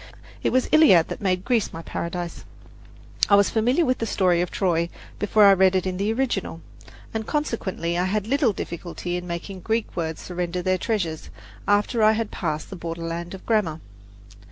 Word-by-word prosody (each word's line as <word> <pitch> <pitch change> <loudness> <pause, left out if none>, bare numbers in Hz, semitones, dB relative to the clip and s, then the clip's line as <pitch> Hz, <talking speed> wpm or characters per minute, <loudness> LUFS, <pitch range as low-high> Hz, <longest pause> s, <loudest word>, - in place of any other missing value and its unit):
It - - +1
was 255 0 +3
the - - +4
Iliad 190 - +6
that - - -6
made 185 -2 0
Greece 235 -5 +1
my 165 - -8
paradise. 170 +1 -5 0.9
I 200 - +7
was 200 0 +4
familiar 250 +9 +2
with 255 -2 0
the 225 - -2
story 180 -4 +2
of 175 - -1
Troy 170 -3 0 0.3
before 210 0 +4
I 200 - +8
read 190 0 +4
it 185 - +1
in 185 -1 -2
the 200 +3 0
original, 225 -9 -2 0.5
and 220 -1 -3
consequently 200 - -2
I 180 - +1
had 205 +2 -1
little 260 0 +2
difficulty 175 -1 -5
in 180 0 -4
making 175 +3 -5
the - - -12
Greek 225 0 -1
words 160 -2 -3
surrender 180 0 -3
their 185 0 +1
treasures 175 -9 -2 0.4
after 205 +3 +2
I 215 0 +6
had 220 -1 -2
passed 155 -2 -3
the - - -5
borderland 170 +1 -5
of 190 - -13
grammar. 200 -9 +1
190 Hz, 190 wpm, -24 LUFS, 170-220 Hz, 0.9 s, I